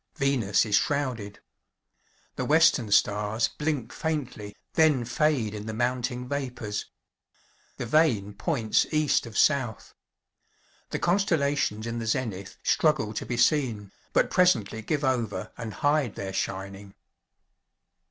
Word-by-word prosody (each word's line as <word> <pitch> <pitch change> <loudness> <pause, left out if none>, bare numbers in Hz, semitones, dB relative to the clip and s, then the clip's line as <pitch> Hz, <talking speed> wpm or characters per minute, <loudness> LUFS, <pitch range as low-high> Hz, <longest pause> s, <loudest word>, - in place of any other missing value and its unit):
Venus 130 -9 +2
is 105 - -4
shrouded. 125 -8 -2 1.0
The - - -2
western 150 -7 +4
stars 105 +2 +2
blink 145 -6 -3
faintly, 130 -10 -4 0.2
then 150 -7 +3
fade 120 -3 +1
in 105 0 -6
the 110 - -4
mounting 125 +1 -1
vapors. 125 -7 -4 0.9
The - - -4
vane 115 -7 +2
points 115 - 0
east 155 -5 +2
of 110 - -7
south. 130 -7 +1 1.0
The - - -2
constellations 145 - +1
in 115 0 -3
the 115 - -4
zenith 110 -5 -3
struggle 150 -9 +2
to - - -5
be 120 - -2
seen, 120 -7 +1 0.2
but - - +2
presently 115 - +2
give 145 +7 -2
over, 115 -8 -1
and 115 -2 -6
hide 145 -2 0
their 95 -1 -5
shining. 95 +1 -4
120 Hz, 125 wpm, -27 LUFS, 105-145 Hz, 1.0 s, western